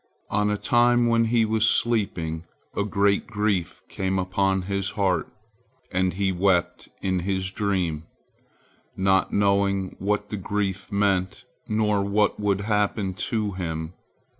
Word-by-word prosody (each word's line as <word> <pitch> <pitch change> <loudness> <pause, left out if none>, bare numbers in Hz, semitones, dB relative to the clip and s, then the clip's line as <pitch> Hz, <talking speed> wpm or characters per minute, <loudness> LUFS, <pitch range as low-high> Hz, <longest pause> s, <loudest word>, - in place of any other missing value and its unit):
On 105 +1 +2
a 105 - 0
time 120 +2 +3
when 115 -1 +3
he 115 0 +3
was 110 0 +3
sleeping, 85 -8 0 0.3
a - - +1
great 100 -1 +1
grief 105 -5 -1
came 95 0 -2
upon 95 +1 0
his 100 0 -2
heart, 95 -5 +1 0.6
and 90 -1 +1
he 95 +1 0
wept 90 -1 +1
in 95 -1 +1
his 95 +1 -2
dream, 90 -7 -1 0.9
not 95 0 +2
knowing 100 -1 +1
what 105 +1 -1
the 105 - -2
grief 95 0 -3
meant, 95 -2 0 0.2
nor 105 -1 +1
what 100 +2 +1
would 100 -1 +1
happen 105 -2 0
to 105 +3 -2
him. 80 -3 -4
100 Hz, 135 wpm, -25 LUFS, 95-105 Hz, 0.9 s, time